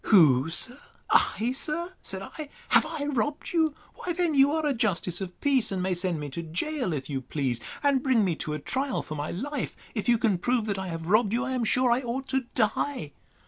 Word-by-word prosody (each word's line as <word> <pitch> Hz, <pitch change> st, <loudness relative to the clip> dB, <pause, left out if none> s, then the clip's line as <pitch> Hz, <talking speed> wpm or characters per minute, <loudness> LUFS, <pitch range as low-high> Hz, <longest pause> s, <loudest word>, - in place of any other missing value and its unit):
Who? 155 Hz, -, +6 dB, 0.6 s
I, 230 Hz, +3 st, +3 dB
sir? 330 Hz, +7 st, -2 dB
said 190 Hz, 0 st, -5 dB
I; 300 Hz, +7 st, -8 dB, 0.2 s
have -, -, +5 dB
I 315 Hz, -3 st, -3 dB
robbed 290 Hz, +3 st, -2 dB
you? 320 Hz, -3 st, +2 dB, 0.2 s
Why 355 Hz, -, -4 dB
then 345 Hz, -2 st, +1 dB
you 275 Hz, 0 st, +5 dB
are 315 Hz, 0 st, 0 dB
a 290 Hz, -, +2 dB
justice 195 Hz, -6 st, 0 dB
of 180 Hz, -2 st, -6 dB
peace, 270 Hz, -6 st, +2 dB
and 185 Hz, -2 st, -1 dB
may 185 Hz, 0 st, +1 dB
send 175 Hz, -2 st, -1 dB
me 145 Hz, -, -4 dB
to 170 Hz, -, -4 dB
gaol, 185 Hz, -, -2 dB
if 140 Hz, -4 st, -3 dB
you 135 Hz, -3 st, -3 dB
please, 130 Hz, -3 st, -2 dB, 0.2 s
and 280 Hz, -2 st, +3 dB
bring 255 Hz, -6 st, +3 dB
me 175 Hz, -3 st, +1 dB
to 150 Hz, -, -3 dB
a 150 Hz, -, -3 dB
trial 265 Hz, -, -1 dB
for 155 Hz, -, -7 dB
my 150 Hz, 0 st, -3 dB
life! 275 Hz, +8 st, -4 dB, 0.2 s
If 215 Hz, 0 st, -2 dB
you 235 Hz, -, +5 dB
can 215 Hz, -6 st, +1 dB
prove 245 Hz, +3 st, +1 dB
that 200 Hz, -3 st, -2 dB
I 190 Hz, -, -4 dB
have 165 Hz, -2 st, -5 dB
robbed 210 Hz, +3 st, +3 dB
you, 245 Hz, +3 st, +1 dB
I 260 Hz, -, -3 dB
am 255 Hz, -2 st, 0 dB
sure 250 Hz, +2 st, +3 dB
I 240 Hz, +2 st, +3 dB
ought 260 Hz, +2 st, -3 dB
to 265 Hz, -1 st, 0 dB
die. 225 Hz, -, 0 dB
230 Hz, 225 wpm, -27 LUFS, 175-275 Hz, 0.6 s, Who